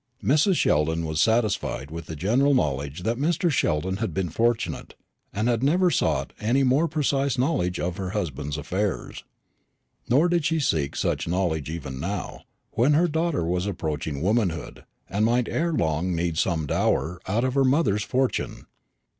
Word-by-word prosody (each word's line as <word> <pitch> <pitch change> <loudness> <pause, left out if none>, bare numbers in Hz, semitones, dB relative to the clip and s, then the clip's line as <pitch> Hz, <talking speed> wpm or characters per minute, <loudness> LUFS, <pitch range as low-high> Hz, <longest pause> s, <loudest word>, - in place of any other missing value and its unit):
Mrs. 155 +8 +3
Sheldon 80 - +1
was 80 0 0
satisfied 110 - 0
with 85 0 -7
the 80 - -6
general 125 - +2
knowledge 75 - -1
that 115 +2 -1
Mr. 165 +3 +1
Sheldon 95 - 0
had 105 -7 -3
been 95 -3 -1
fortunate, 115 +7 -1 0.4
and 105 +4 -1
had 120 -1 +1
never 175 +6 +3
sought - - 0
any 120 +6 +2
more 135 +6 +3
precise 140 -3 0
knowledge 105 - 0
of 90 0 -2
her 95 -2 -3
husband's 75 -7 -3
affairs. 95 +6 -3 0.9
Nor 140 +8 +4
did 175 -2 +1
she 160 +1 +1
seek 80 - 0
such - - -1
knowledge 85 -5 -1
even 70 -5 -6
now, 95 +5 -4 0.3
when 125 +7 +3
her 170 +4 +4
daughter 160 - 0
was 90 +3 -1
approaching 80 -5 -3
womanhood, 95 -6 -1 0.2
and 100 +2 -1
might 120 +1 +2
ere 170 +2 0
long 85 - 0
need 85 0 -1
some 80 -1 0
dower 85 +4 0
out 105 +5 +1
of 130 -1 0
her 135 0 +3
mother's 130 -7 +2
fortune. 130 +3 -1
100 Hz, 165 wpm, -25 LUFS, 80-135 Hz, 0.9 s, Nor